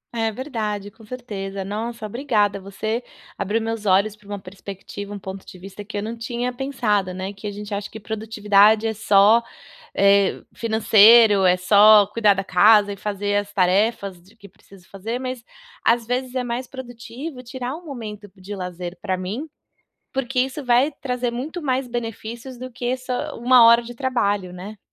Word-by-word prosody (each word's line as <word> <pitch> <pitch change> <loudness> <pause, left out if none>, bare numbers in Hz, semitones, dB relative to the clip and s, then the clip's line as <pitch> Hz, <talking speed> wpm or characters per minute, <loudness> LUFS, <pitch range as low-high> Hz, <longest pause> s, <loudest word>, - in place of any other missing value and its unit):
É 225 -1 0
verdade, 210 -5 -4
com 225 - -19
certeza, 200 -5 -6
nossa 220 +3 -5
obrigada. 210 -4 0
Você 215 +5 -4 0.3
abriu 215 +4 -1
meus 225 -2 -4
olhos 200 +3 +3
para 210 -1 -22
uma 205 0 -5
perspectiva, 200 +1 -9
um 205 - -5
ponto 190 0 -8
de 185 - -13
vista 195 +3 -10
que 205 0 -7
eu 205 - -2
não 225 +2 -4
tinha 240 +2 -3
pensado, 225 -8 -1
né. 190 +2 -5
Que 205 +2 -8
a - - -3
gente 205 0 -7
acha 200 0 -4
que 220 - -9
produtividade 215 0 +2
é 220 - 0
só, 210 +1 +5 0.5
eh, 200 0 +3
financeiro, 220 -2 +6
é 180 0 +4
só 205 +2 +7
cuidar 210 -1 +2
da 195 - -2
casa 205 +2 +5
e - - -8
fazer 205 0 -2
as 205 0 -3
tarefas 195 0 +1
de 195 +6 -22
que 200 -2 -15
preciso 190 -1 -20
fazer. 220 +5 -5
Mas 255 -2 -5 0.4
às 230 0 +2
vezes 250 +1 -3
é 255 - 0
mais 245 +1 -4
produtivo 250 +2 -8
tirar 250 +2 -5
um 350 - -11
momento 215 - -8
b - - -21
de 200 +2 -7
lazer 180 -1 -6
pra 190 -2 -1
mim, 215 - -5 0.6
porque 265 -1 -2
isso 265 +3 -1
vai 250 +4 +3
trazer 250 -2 -2
muito 300 +9 -5
mais 260 -3 -1
benefícios 235 +1 -6
do 255 +1 -8
que 245 +1 -2
só 255 -1 -4
1h 240 -1 +6
de 240 +1 -9
trabalho, 205 -8 -1
né? 195 +4 -9
215 Hz, 180 wpm, -22 LUFS, 200-245 Hz, 0.6 s, só